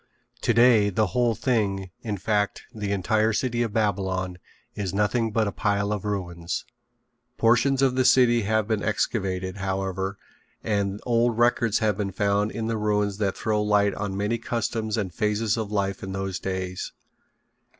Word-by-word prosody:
Today 115 -4 +5
the 110 +3 +1
whole 120 -2 +2
thing, 100 -7 0
in 105 -3 -3
fact, 105 +1 0
the 105 -2 -3
entire 110 +3 +1
city 120 +1 0
of 115 -3 0
Babylon, 95 -4 -1 0.3
is 100 -2 -3
nothing 110 +2 +1
but 110 0 +1
a - - -1
pile 100 -1 0
of 105 -1 -4
ruins. 85 -4 -3 0.7
Portions 125 +4 +3
of 130 -2 +3
the 130 0 +2
city 120 -2 +5
have 110 0 +1
been 110 -2 0
excavated, 95 -3 -1
however, 95 0 -2 0.5
and 100 -2 -1
old 120 -1 +2
records 120 -2 +3
have 105 -3 +1
been 100 -2 -1
found 100 +2 +1
in 115 - -4
the 115 0 -1
ruins 105 -1 0
that 100 -3 0
throw 110 -1 0
light 105 -1 +3
on 100 -2 -4
many 105 +4 0
customs 115 -1 -2
and 95 -5 -2
phases 105 0 0
of 110 -3 -4
life 100 -2 -1
in 95 0 -5
those 95 -1 -3
days. 95 -1 -4
105 Hz, 160 wpm, -25 LUFS, 95-115 Hz, 0.7 s, Today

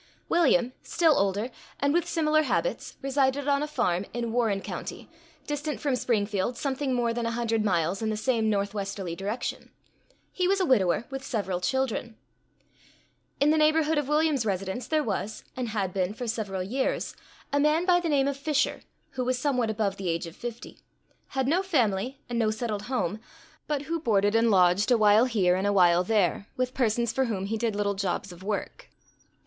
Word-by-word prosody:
William, 265 -7 +3
still 325 -3 +3
older, 200 +5 0 0.3
and 285 +1 +2
with 345 0 +1
similar 310 -1 +2
habits, - - -2
resided 275 0 +1
on 280 0 +2
a 300 - -1
farm 180 -11 0
in 235 -1 -2
Warren 225 -4 +1
county, - - -7 0.4
distant 295 +1 -3
from 280 -3 0
Springfield 215 -1 0
something 270 -1 -1
more 235 -1 +1
than 235 0 -2
a 230 0 -2
hundred 225 -2 0
miles 180 -1 0
in 220 - 0
the 215 - -1
same 225 -1 +1
northwesterly 200 -3 -2
direction. 205 +6 -4 0.6
He 365 -1 0
was 395 +1 +2
a 375 - +2
widower, 215 - +2
with 270 0 -5
several 195 -8 -2
children. 245 +1 -1 1.2
In 290 +2 +4
the 315 - +3
neighborhood 310 0 +3
of 290 - -3
William's 300 -3 +2
residence, 195 +3 -3
there 310 -1 +1
was, 215 -2 -3
and 250 -2 -3
had 200 -4 -2
been 190 +1 -1
for 245 - -5
several 205 -5 -2
years, 260 +8 -2 0.4
a 285 - +3
man 305 +4 +3
by 355 -1 +4
the 345 -2 -2
name 280 -2 +3
of 280 - -1
Fisher, 285 +1 0 0.3
who 255 - -3
was 255 0 0
somewhat 250 -4 0
above 210 -2 -1
the 190 -3 -3
age 165 0 -1
of 165 0 -10
fifty; 240 -1 -8 0.5
had 265 -1 -1
no 335 +6 +3
family, 255 - 0
and 240 -1 -2
no 220 -2 +2
settled 215 -2 -3
home; 210 -5 -1 0.5
but 290 -2 -1
who 330 +3 -2
boarded 205 -7 +2
and 225 0 +4
lodged 185 +1 +4
a 245 - +5
while 215 +2 +5
here 195 -8 +2
and 190 +2 0
a - - +3
while 175 -2 +5
there, 200 -1 +1
with 255 0 -1
persons 235 -2 +1
for 265 - +1
whom 200 -5 -2
he 215 +3 -2
did 225 -1 -1
little 205 -1 0
jobs 195 -1 -2
of 175 0 -12
work. 210 - -4
235 Hz, 190 wpm, -27 LUFS, 200-275 Hz, 1.2 s, a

